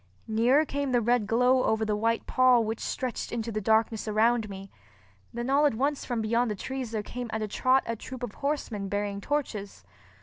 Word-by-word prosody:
Nearer 245 +7 +3
came 280 -2 -2
the 245 - +4
red 235 -2 +1
glow 250 +3 +3
over 220 0 +1
the 210 -1 0
white 230 +2 0
pall 255 -2 +4
which 220 +1 -3
stretched 255 -3 -3
into 230 -1 -3
the 215 0 -2
darkness 220 +1 +1
around 220 +1 +2
me. 195 0 -9 0.6
Then 240 +1 -4
all 285 +2 +4
at 280 - -1
once 280 +4 -1
from 240 -3 -2
beyond 230 +2 +1
the 210 - -2
trees 260 +4 -5
there 220 -2 -3
came 245 +2 -6
at 220 0 -2
a - - -2
trot 255 +5 +2
a 230 - -2
troop 255 +3 -9
of 230 -5 -4
horsemen 240 -9 -3
bearing 205 0 -2
torches. 220 -7 -3
230 Hz, 205 wpm, -28 LUFS, 215-255 Hz, 0.6 s, the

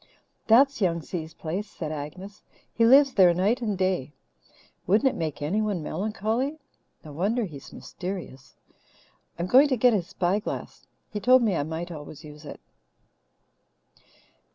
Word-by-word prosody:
"That's 270 +3 +5
Young 170 -4 +1
Si's 165 -1 -6
place," 185 +6 -4
said 155 -3 -6
Agnes. 155 +7 -8 0.3
"He 230 0 +3
lives 275 +2 +6
there 180 -3 +5
night 210 +8 +1
and 210 -4 -2
day. 185 -7 -1 0.7
Wouldn't 215 +8 +4
it - - 0
make 155 -3 -4
anyone 200 +1 -1
melancholy? 220 - -2 0.5
No 150 - -9
wonder 210 +10 0
he's 145 -7 -11
mysterious. 175 -8 -8 0.8
I'm 170 - -2
going 260 +10 +6
to 260 -3 0
get 245 +1 +4
his 185 -5 -1
spyglass. 190 +5 -3 0.2
He 210 - -3
told 250 +4 +5
me 210 -5 +1
I - - 0
might 160 +4 -5
always 150 -2 -9
use 150 0 -12
it." - - -9
190 Hz, 145 wpm, -26 LUFS, 160-225 Hz, 0.8 s, lives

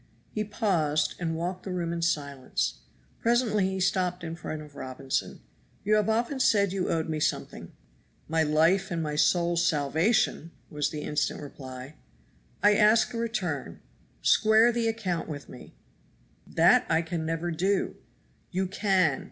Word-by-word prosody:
He 215 - -2
paused 180 -9 0
and 165 -2 -2
walked 180 +3 -3
the 190 - -6
room 170 -2 -2
in 170 - -3
silence. 140 - -1 0.4
Presently 230 -5 +2
he 190 0 -3
stopped 185 -1 0
in 165 0 -5
front 155 -2 -6
of 150 -1 -14
Robinson. 130 0 -4 0.4
"You 210 - +2
have 215 0 +3
often 235 +5 0
said 200 -6 +3
you 190 -2 -1
owed 160 -1 0
me 155 -1 -2
something." - - -3 0.6
"My 160 +1 +1
life 165 +6 +3
and 170 -3 -2
my 150 -1 -3
soul's 170 +2 +2
salvation," 160 - +1 0.2
was 150 -1 -1
the 150 - -5
instant 150 0 -1
reply. 135 -1 -9 0.7
"I 205 0 +6
ask 220 +2 +4
a - - -3
return; 195 - -3 0.4
square 220 +2 +5
the 235 -1 0
account 190 -8 -2
with 145 -2 -7
me." 125 - -13 0.7
"That - - +4
I 165 +1 +2
can 165 0 -3
never 165 +2 -2
do." 190 +4 0 0.5
"You 190 +1 -1
can! 185 -6 +1
170 Hz, 150 wpm, -27 LUFS, 155-200 Hz, 0.7 s, I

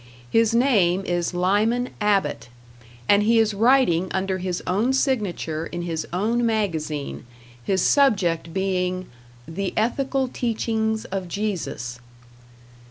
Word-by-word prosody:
His 225 0 +3
name 195 -8 +3
is 175 -1 -1
Lyman 210 +7 +1
Abbott, 205 -10 0 0.6
and 200 0 +5
he 225 +2 +3
is 220 -1 +3
writing 215 -6 +3
under 190 0 -1
his 180 -1 -3
own 215 +8 +1
signature 200 - -1
in 175 0 -5
his 165 -2 -3
own 220 +7 0
magazine, 160 -10 -2 0.4
his 190 +8 +1
subject 190 - +2
being 185 -1 -1 0.4
"The 190 +4 -4
Ethical 265 +4 0
Teachings 220 -2 -1
of 190 -1 -4
Jesus". 170 - -4
195 Hz, 115 wpm, -23 LUFS, 175-225 Hz, 0.6 s, and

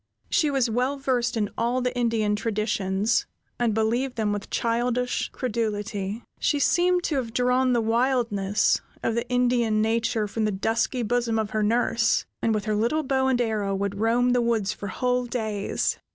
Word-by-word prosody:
She 305 - +3
was 270 -3 +1
well 250 +5 0
versed 245 -3 0
in 210 -2 -1
all 240 +2 +1
the 250 0 -2
Indian 225 -4 +1
traditions, 210 -1 0 0.3
and 240 -2 +2
believed 240 +4 0
them 215 -2 0
with 205 -1 -5
childish 245 +1 0
credulity. 215 -3 -3 0.2
She 295 - +1
seemed 355 +4 +2
to 300 - 0
have 235 -4 -3
drawn 250 +1 +2
the 240 - +2
wildness, 225 -4 +1 0.2
of 225 - +1
the 235 +2 -2
Indian 245 -3 +2
nature 225 0 +1
from 220 +2 -2
the 210 - +1
dusky 225 +5 0
bosom 235 0 0
of 220 -2 -1
her 215 - 0
nurse, 225 +1 +2 0.2
and 225 - +1
with 210 -2 -1
her 215 - 0
little 235 +9 +1
bow 265 -1 +1
and 260 -2 +2
arrow 215 -4 0
would 200 0 -3
roam 240 +3 +2
the 245 0 +3
woods 230 -4 0
for 200 - -7
whole 250 +4 0
days. 220 -4 -2
230 Hz, 175 wpm, -25 LUFS, 215-250 Hz, 0.3 s, She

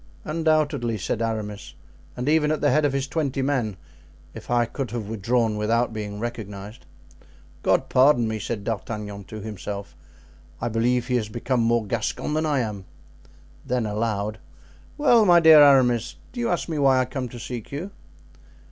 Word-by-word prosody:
"Undoubtedly," 155 -7 0
said 105 +3 -3
Aramis, 105 -2 -4 0.4
"and 125 +2 -3
even 150 0 +3
at 155 - 0
the 145 - +2
head 155 0 +3
of 145 - +2
his 135 0 -1
twenty 140 -3 -1
men, 125 -8 -1 0.6
if - - -11
I 120 -1 +3
could 130 +2 -5
have 110 -2 -5
drawn 115 0 +1
without 115 +3 +1
being 105 -2 -5
recognized." 105 -2 -7 0.7
"God - - +2
pardon 130 -3 +4
me!" 110 0 -3
said 105 -1 -4
D'Artagnan 105 -2 -5
to 110 +2 -8
himself, 100 -1 -6 0.6
"I 120 - -2
believe 120 +2 +1
he 125 0 +1
has 110 -3 -3
become 120 +2 -1
more 115 -1 +2
Gascon 115 +7 -2
than 155 +1 0
I 145 -3 +1
am!" 105 -4 -5 0.8
Then 125 -2 -1
aloud: 105 0 -2 0.6
"Well, 245 -7 +5
my 175 -4 +6
dear 160 -2 +8
Aramis, 130 -5 +4 0.2
do 245 - -8
you 235 - 0
ask 175 - -1
me 160 -3 -3
why 135 -2 +4
I 130 - +2
came 130 0 -5
to 120 - -9
seek 120 -1 -7
you?" 165 +8 -5
120 Hz, 170 wpm, -24 LUFS, 110-140 Hz, 0.8 s, dear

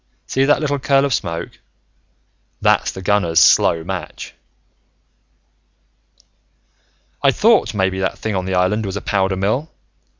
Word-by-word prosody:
See 135 +1 0
that 145 - +3
little 145 -2 -2
curl 135 +1 +2
of 140 - -1
smoke? 85 -5 -4 1.0
That's - - +2
the 95 - -9
gunner's 90 -4 +2
slow 80 -1 +4
match. 95 +1 -7 2.9
"I'd - - +3
thought - - +2
maybe 95 -1 0
that 95 - -2
thing 110 -2 -4
on 95 -1 -2
the 95 0 -2
island 95 +4 +1
was 100 -1 -4
a - - -5
powder 95 -2 0
mill. 110 +11 -1
95 Hz, 135 wpm, -18 LUFS, 95-125 Hz, 2.9 s, slow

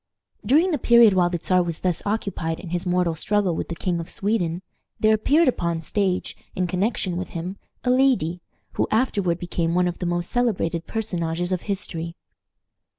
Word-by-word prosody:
During 325 +8 +4
the 300 - 0
period 235 -3 +6
while 180 -2 +3
the 175 - -1
Czar 185 +2 +2
was 170 -2 -2
thus 180 -3 0
occupied 200 -6 -2
in 180 - -8
his 175 +1 -2
mortal 180 -1 +2
struggle 190 +2 0
with - - -3
the 170 - -3
King 175 +1 -1
of 165 - -6
Sweden, 190 -4 -1 0.4
there 215 0 +4
appeared 290 +10 +3
upon 170 -9 0
the 165 - -8
stage, 190 -1 -1 0.2
in 180 - 0
connection 185 0 -1
with 185 - -4
him, 180 +4 -5 0.3
a 250 - +2
lady, 250 -11 +2 0.3
who - - 0
afterward 205 -7 +1
became 175 -1 -1
one 180 0 +3
of 175 - -4
the 180 - -2
most 175 0 -2
celebrated 180 -9 0
personages 175 -5 -2
of 180 -2 0
history. 170 -4 -3
180 Hz, 185 wpm, -23 LUFS, 170-215 Hz, 0.4 s, period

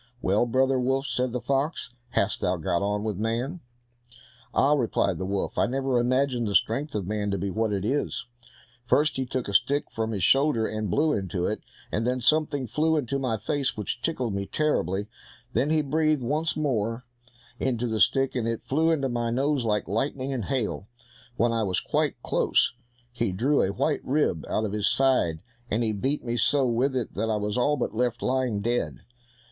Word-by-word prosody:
"Well, 105 +3 +2
brother 130 +2 +2
wolf," 135 +2 0
said 125 -1 -1
the 125 - -2
fox, 135 +6 -1 0.2
"how - - +2
hast - - -4
thou 90 0 +1
got 85 +2 0
on 105 +1 -1
with 105 -3 -2
man?" 120 +10 -2 0.9
"Ah!" 140 +2 +3
replied 115 - +1
the 95 - -3
wolf, 100 0 -2
"I - - +3
never 130 0 0
imagined 125 -1 +1
the 100 - -1
strength 135 +8 +1
of 100 -4 -1
man 105 +1 -2
to 100 - 0
be 95 +1 -2
what 110 +3 0
it 100 -1 -1
is! 140 +6 -1 0.6
First, 145 +5 +2
he 130 -1 -2
took 130 -1 -3
a 100 - -4
stick 140 +8 +2
from 110 0 -2
his 100 -5 -2
shoulder, 135 - +4
and 110 -2 -3
blew 150 - +2
into 95 -2 -2
it, 105 - -2 0.3
and 115 +3 0
then 125 +1 0
something 145 +1 +2
flew 155 +7 +1
into 140 -1 -1
my 125 -4 -1
face 135 +4 -1
which 105 +3 -3
tickled 130 -9 -1
me 100 0 -3
terribly; 100 - 0 0.5
then 140 - +1
he 155 -1 +2
breathed 155 -1 +1
once 155 +7 0
more 120 -5 -1 0.5
into 125 -2 0
the 110 -2 -1
stick, 135 +3 +3
and 120 -3 -1
it 115 -1 -3
flew 160 +4 +2
into 145 -5 +1
my 120 -2 -1
nose 135 +1 +1
like 105 -2 0
lightning 130 +5 -1
and 120 -6 -3
hail; 120 -6 -2 0.5
when 120 +1 +3
I 115 -1 0
was 95 -4 0
quite - - -1
close, - - +2 0.4
he 120 -4 -1
drew 130 +10 +2
a 95 - +1
white 140 +8 0
rib 130 - 0
out 110 - 0
of 105 - -3
his 105 -1 +1
side, 125 -13 +2 0.3
and 115 +3 +1
he 110 - +1
beat 130 +8 -2
me 120 0 -1
so 135 +4 +3
with 125 +3 +1
it 125 -4 -2
that 110 +3 -1
I 110 - +1
was 105 0 -2
all 145 +4 +2
but - - -2
left 120 +1 -1
lying 125 -5 0
dead." 120 +3 -1
120 Hz, 200 wpm, -26 LUFS, 105-135 Hz, 0.9 s, shoulder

